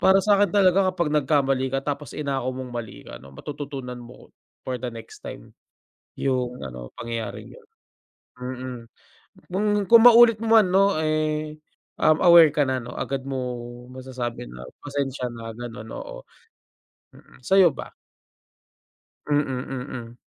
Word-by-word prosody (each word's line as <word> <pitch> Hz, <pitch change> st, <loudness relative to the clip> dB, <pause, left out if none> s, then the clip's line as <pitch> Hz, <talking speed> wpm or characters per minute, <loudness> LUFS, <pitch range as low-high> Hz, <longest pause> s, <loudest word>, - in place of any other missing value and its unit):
Para 190 Hz, +1 st, +5 dB
sakin 200 Hz, +1 st, +3 dB
talaga 190 Hz, -1 st, +4 dB
kapag 170 Hz, -5 st, -1 dB
nagkamali 135 Hz, -3 st, +1 dB
ka 135 Hz, +1 st, -3 dB
tapos 145 Hz, 0 st, -4 dB
inako 135 Hz, -4 st, -2 dB
mong 130 Hz, -1 st, -7 dB
mali 115 Hz, -3 st, -7 dB
ka -, -, -10 dB
no 70 Hz, -, -13 dB
matututunan 135 Hz, -, -7 dB
mo, 120 Hz, +1 st, -15 dB, 0.3 s
for 130 Hz, -, -2 dB
the 125 Hz, +1 st, -5 dB
next 115 Hz, -1 st, -11 dB
time. -, -, -10 dB, 0.6 s
Yung 125 Hz, -2 st, -1 dB
ano, 60 Hz, -2 st, -9 dB
pangyayaring 115 Hz, -1 st, -6 dB
yun. 485 Hz, -3 st, -17 dB, 0.7 s
Mm, 125 Hz, -1 st, -6 dB, 0.7 s
kung 190 Hz, +4 st, -1 dB, 0.2 s
kung 230 Hz, -1 st, +9 dB
maulit 235 Hz, -2 st, +8 dB
mo 225 Hz, 0 st, +2 dB
man 190 Hz, -, +2 dB
ano 195 Hz, -3 st, +3 dB
eh, 155 Hz, 0 st, -1 dB, 0.4 s
um, 155 Hz, 0 st, +4 dB
aware 170 Hz, -4 st, +8 dB
ka 150 Hz, -, +1 dB
na 130 Hz, -, 0 dB
ano 120 Hz, +1 st, -9 dB
agad 135 Hz, -1 st, -4 dB
mong 125 Hz, -2 st, -5 dB
masasabi 125 Hz, -, -5 dB
na 60 Hz, +1 st, -11 dB, 0.2 s
pasensya 140 Hz, -2 st, -3 dB
na 115 Hz, -1 st, -8 dB
ganun 115 Hz, -2 st, -8 dB
oo. -, -, -8 dB, 0.9 s
Mm, -, -, -19 dB
sayo 190 Hz, +4 st, +5 dB
ba? -, -, -8 dB, 1.4 s
Mm, 145 Hz, -1 st, +2 dB, 0.3 s
mm. 125 Hz, -2 st, -7 dB
135 Hz, 140 wpm, -24 LUFS, 125-160 Hz, 1.4 s, kung